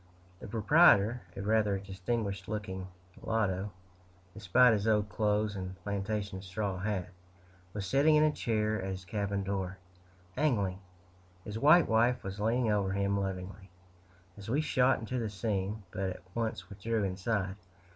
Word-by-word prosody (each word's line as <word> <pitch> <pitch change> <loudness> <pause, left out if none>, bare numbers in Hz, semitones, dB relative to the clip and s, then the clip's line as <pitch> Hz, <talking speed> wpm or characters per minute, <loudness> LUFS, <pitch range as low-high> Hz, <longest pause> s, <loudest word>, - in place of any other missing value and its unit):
The - - -8
proprietor, 115 - +5 0.2
a 95 - -4
rather 105 -1 +2
distinguished 100 +1 -3
looking 95 -3 -4 0.3
mulatto, 100 -3 -1 0.6
despite 115 +4 +4
his 105 0 0
old 105 -1 +2
clothes 105 -1 0
and 95 -1 -5
plantation 100 -1 -3
straw 95 0 -3
hat, 95 -2 -2 0.6
was 100 0 -4
sitting 140 +10 +4
in 150 - +5
a 155 - +4
chair 110 -5 -1
at 95 - -4
his 95 -1 -5
cabin 100 0 -2
door, 95 -1 -3 0.6
angling; 105 -10 +1 0.6
his 105 +2 -5
white 155 +5 +6
wife 120 +3 +2
was 95 +1 -6
leaning 115 +2 +1
over 100 -2 +1
him 100 0 0
lovingly, 95 0 -5 0.7
as 100 +2 -9
we 135 +6 +2
shot 130 -4 +3
into 125 +3 -3
the 115 -2 -2
scene, 100 0 -2
but 95 0 -2
at 90 - -8
once 110 -5 -3
withdrew 105 +3 -2
inside. 95 0 -1
105 Hz, 145 wpm, -31 LUFS, 95-110 Hz, 0.7 s, white